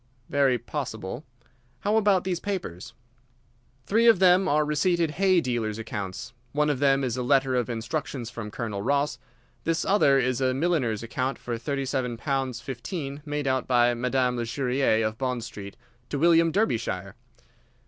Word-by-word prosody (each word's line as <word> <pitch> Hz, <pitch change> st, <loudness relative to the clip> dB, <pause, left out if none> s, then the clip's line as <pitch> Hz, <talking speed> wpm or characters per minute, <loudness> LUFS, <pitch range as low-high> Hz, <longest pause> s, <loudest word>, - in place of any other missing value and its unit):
"Very 135 Hz, -3 st, +3 dB
possible. 120 Hz, -2 st, -5 dB, 0.6 s
How 205 Hz, +7 st, +1 dB
about 205 Hz, -4 st, +3 dB
these 180 Hz, -2 st, -2 dB
papers?" 180 Hz, -, -5 dB, 0.9 s
"Three 230 Hz, +3 st, +3 dB
of 230 Hz, -, +7 dB
them 185 Hz, +1 st, +5 dB
are 150 Hz, +1 st, +2 dB
receipted 165 Hz, +2 st, +1 dB
hay 185 Hz, +1 st, +3 dB
dealers' 115 Hz, -5 st, -2 dB
accounts. 105 Hz, -4 st, -6 dB, 0.2 s
One 150 Hz, +1 st, +2 dB
of 135 Hz, -, -2 dB
them 135 Hz, -1 st, +3 dB
is 125 Hz, -2 st, -1 dB
a -, -, -1 dB
letter 135 Hz, +1 st, +2 dB
of 125 Hz, -1 st, 0 dB
instructions 120 Hz, +1 st, -4 dB
from 105 Hz, -2 st, -6 dB
Colonel 105 Hz, -2 st, -4 dB
Ross. 140 Hz, +2 st, 0 dB, 0.4 s
This 165 Hz, 0 st, 0 dB
other 165 Hz, -9 st, +4 dB
is 130 Hz, 0 st, 0 dB
a 130 Hz, -1 st, +2 dB
milliner's 135 Hz, -9 st, 0 dB
account 130 Hz, +4 st, -2 dB
for 120 Hz, -, -4 dB
thirty 135 Hz, +3 st, -2 dB
seven 125 Hz, -3 st, -2 dB
pounds 135 Hz, -1 st, -2 dB
fifteen 140 Hz, +2 st, -5 dB
made 145 Hz, 0 st, -2 dB
out 130 Hz, -1 st, 0 dB
by 120 Hz, -1 st, +4 dB
Madame 125 Hz, +1 st, 0 dB
Lesurier, 125 Hz, -1 st, +1 dB
of 110 Hz, 0 st, -3 dB
Bond 125 Hz, -3 st, -2 dB
Street, 100 Hz, -4 st, -9 dB, 0.3 s
to 145 Hz, -, -2 dB
William 165 Hz, +2 st, +4 dB
Derbyshire. 225 Hz, -, -1 dB
135 Hz, 160 wpm, -26 LUFS, 120-155 Hz, 0.9 s, of